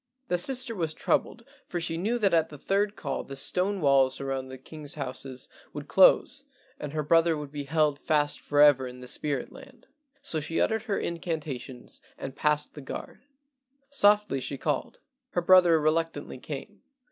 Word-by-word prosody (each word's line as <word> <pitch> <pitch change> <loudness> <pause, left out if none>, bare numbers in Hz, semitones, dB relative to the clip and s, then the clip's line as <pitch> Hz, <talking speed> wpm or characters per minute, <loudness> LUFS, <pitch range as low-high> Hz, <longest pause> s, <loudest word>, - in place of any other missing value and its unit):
The 180 - +2
sister 255 +3 +1
was 165 -6 -2
troubled, 235 - -1 0.2
for 175 - -3
she 165 -1 -1
knew 210 +8 0
that 200 -6 +2
at 160 -1 +3
the 150 - -10
third 200 +6 0
call 140 -8 -4
the 135 - -9
stone 185 +7 -1
walls 135 -2 +3
around 135 -1 -3
the 130 0 -9
king's 145 +2 -6
houses 130 -2 -4 0.3
would 145 0 -7
close 190 - +4 0.4
and 145 - -5
her 155 0 -2
brother 165 +1 +3
would 145 -2 -7
be 145 -1 -5
held 150 -1 +1
fast 150 -1 +1
forever 145 -3 +4
in 125 0 -10
the 125 - -9
spirit 140 +1 -2
land, 260 -3 -15 0.4
so 160 - +1
she 160 +2 -3
uttered 220 0 +1
her 205 -4 -1
incantations 155 -7 -5 0.2
and 135 - -7
passed 150 -1 0
the 145 - -9
guard. 135 - -8 0.7
Softly 205 - +3
she 140 - -4
called. 145 -1 -3 0.3
Her 175 - +1
brother 175 -2 +6
reluctantly 155 -3 -1
came. 140 +1 -8
155 Hz, 170 wpm, -27 LUFS, 140-180 Hz, 0.7 s, brother